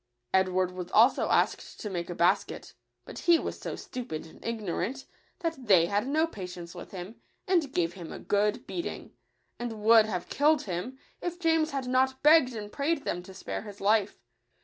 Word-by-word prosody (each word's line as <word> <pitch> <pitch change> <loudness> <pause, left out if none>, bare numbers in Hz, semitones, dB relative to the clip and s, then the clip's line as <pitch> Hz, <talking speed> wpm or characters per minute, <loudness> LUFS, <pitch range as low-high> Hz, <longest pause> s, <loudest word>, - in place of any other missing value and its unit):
Edward 185 -1 +2
was 180 -1 -6
also 235 +5 +5
asked - - +1
to - - -5
make 175 -2 -3
a 175 - -4
basket; 170 - +1 0.3
but - - -8
he 340 -1 +5
was - - -5
so - - -5
stupid 235 -12 -6
and 160 - -15
ignorant, 230 +3 -3 0.4
that 325 -8 -3
they 180 -5 +6
had 205 +6 0
no 310 +3 +2
patience 180 - -8
with 175 - -9
him, 190 +3 -9 0.3
and 340 -7 +2
gave 170 -5 0
him 170 -3 -9
a - - -6
good 210 +5 0
beating, 345 - -5 0.5
and 225 -3 -5
would 220 0 +7
have 180 -5 -3
killed 300 0 +3
him, 195 +8 -4 0.2
if 350 0 -4
James 325 -2 +2
had 275 -3 -3
not 260 +1 +1
begged 300 -5 +6
and 210 -1 -6
prayed 285 +3 -1
them 175 - -2
to 180 - -12
spare - - -5
his 205 -1 -10
life. 205 0 +2
220 Hz, 185 wpm, -29 LUFS, 185-275 Hz, 0.5 s, would